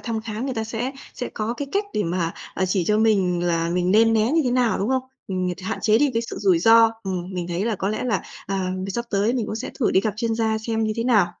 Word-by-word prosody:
thăm 225 -2 -3
khám, 220 +2 -5
người 265 - -2
ta 225 -1 -2
sẽ 230 +4 -3 0.2
sẽ 245 - -4
có 220 +1 -2
cái 280 +3 -5
cách 405 +1 +1
để 210 - +1
mà, 170 -1 -1 0.2
ờ, 190 - 0
chỉ 185 -1 0
cho 210 +3 +2
mình 190 -6 +2
là 165 -1 +1
mình 180 +1 +1
nên 225 +3 +5
né 220 +5 +2
như 330 - +4
thế 250 - +1
nào, 245 -2 +2
đúng 200 - -1
không? 260 0 +1 0.3
Mình 185 -1 -1
ng 180 - -2
hạn - - -2
chế 215 +1 +4
đi 290 -1 +3
cái 230 - +1
sự - - -6
rủi 190 -5 +3
ro. 225 +4 +6
Ừm, 185 -2 -4
mình 175 -1 -3
thấy 175 +3 -1
là 225 -2 0
có 190 - -2
lẽ 215 - -2
là, 225 -7 0 0.2
à, 190 -1 -1
mì 190 +1 -4
sắp 235 +5 -2
tới 205 +3 +2
mình 230 -4 -1
cũng 215 - -4
sẽ 245 - -5
thử 235 - +3
đi 190 - +4
gặp 210 0 -2
chuyên 230 0 -1
gia 220 -1 0
xem 225 0 -1
như 215 - 0
thế 230 - -1
nào. 225 -7 +4
215 Hz, 295 wpm, -23 LUFS, 185-230 Hz, 0.3 s, ro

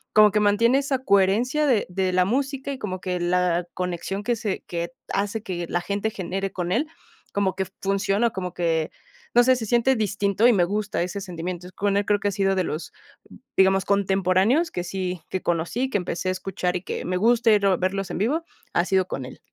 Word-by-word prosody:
como 215 0 +8
que 210 - +2
mantiene 215 +5 +4
esa 275 -1 0
coherencia 225 +8 +3
de 245 -7 +2
de 185 0 -1
la 180 0 +4
música, 275 +5 -1
y 275 - -4
como 185 -7 -5
que 180 -1 -2
la 175 0 +1
conexión 180 +2 -3
que 240 +2 +1
se 205 -3 -3
que 170 0 -3 0.2
hace 205 +2 -1
que 180 -4 -4
la 175 - 0
gente 200 +3 -2
genere 195 0 -3
con 180 -2 -3
él, 275 +10 +1 0.5
como 195 -2 0
que 190 0 -1 0.2
funciona, 195 +3 +1
como 180 -4 -5
que, 165 -3 0 0.4
no 240 - +7
sé, 255 +1 +5
se 235 -3 -4
siente 240 +4 +3
distinto, 205 -1 +1
y 245 - +6
me 180 -4 +3
gusta 205 +1 -2
ese 180 +3 -3
sentimiento. 180 -2 -5
Entonces 185 - -12
con 200 0 +1
él, 205 - +1
creo 205 0 +2
que 205 - -1
ha - - -3
sido 195 -1 +1
de 185 - +1
los, 155 0 -5 0.6
digamos, 190 0 +4
contemporáneos 195 - +2
que 175 - -3
sí 180 -1 -3
que 185 - -2
conocí, 175 +10 -1
que 230 - +1
empecé 180 0 -4
a - - +2
escuchar, 185 -1 -2
y 180 - -3
que - - -4
me 185 - -1
guste 230 +2 +4
ir 200 -1 +1
a 190 -2 +4
verlos 190 +1 -1
en - - -3
vivo, 275 - 0 0.3
ha 175 - +3
sido 190 -1 +2
con 135 - -4
él. 125 - -11
195 Hz, 220 wpm, -24 LUFS, 180-215 Hz, 0.6 s, como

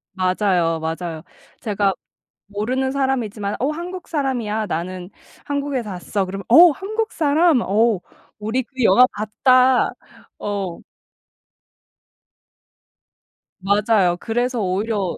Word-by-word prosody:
맞아요, 185 -3 +1
맞아요. 160 0 -4 0.4
제가 200 -3 0 0.5
모르는 250 +6 -2
사람이지만 235 -7 -1
"어 265 - 0
한국 350 +3 -7
사람이야. 240 -8 -2
나는 180 +2 -4 0.4
한국에서 280 -6 -2
왔어." 190 +2 -2
그러면 195 +1 -6
"어 335 +9 +9
한국 435 +7 -3
사람? 310 -2 +3
어 215 +1 +2 0.4
우리 220 +5 -1
그 260 +1 -5
영화 225 +4 +6
봤다." 255 +4 +3 0.5
어. 195 -4 -4 2.8
맞아요. 200 -2 +2
그래서 240 +3 -1
오히려 195 0 -1
215 Hz, 225 characters per minute, -21 LUFS, 195-265 Hz, 2.8 s, 어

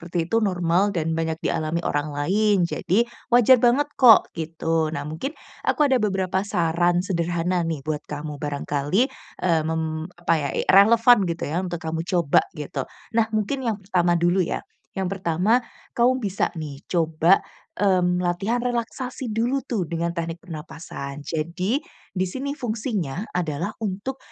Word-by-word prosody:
itu 175 +6 +1
normal 185 -1 +1
dan 165 -1 0
banyak 160 0 -1
dialami 160 +1 -1
orang 145 -1 -1
lain. 195 +6 +2
Jadi, 190 +5 +1 0.2
wajar 245 +1 +6
banget 260 +5 +3
kok, 240 -5 +7
gitu. 165 0 -1
Nah, 140 - -3
mungkin 160 - -5 0.2
aku 300 - +1
ada 260 - +4
beberapa 190 -3 0
saran 175 -1 +1
sederhana 175 -1 -1
nih 155 -4 -3
buat 155 0 -2
kamu 150 0 -6
barangkali, 145 - 0 0.3
eee, 165 -3 +3
mem 160 0 -2
apa 175 -1 0
ya, 145 - -1
e - - 0
relevan 230 +5 +7
gitu 170 0 -3
ya, 160 +4 -1
untuk 175 -2 -4
kamu 160 0 -3
coba 170 -6 +3 0.2
gitu. 150 -2 -4 0.2
Nah, 225 -1 +2
mungkin 215 +6 -1
yang 225 - +1
pertama 175 -2 +2
dulu 175 +2 +2
ya, 180 - -1 0.3
yang 190 -1 -2
pertama 190 +5 +2 0.3
kamu 250 +2 +3
bisa 200 -1 0
nih 150 -3 -6
coba, 165 +1 +3 0.4
mmm, 180 -3 +2
latihan 195 +7 0
relaksasi 250 +1 -3
dulu 235 +5 +1
tuh 220 -7 -1
dengan 170 +1 -2
teknik 170 0 -4
pernapasan. 150 -4 -7
Jadi 170 - -1 0.3
di 185 -1 -1
sini 265 +9 -4
fungsinya 215 - -3
adalah 170 0 -2 0.2
untuk, 205 +7 -4
175 Hz, 150 wpm, -24 LUFS, 160-215 Hz, 0.4 s, kok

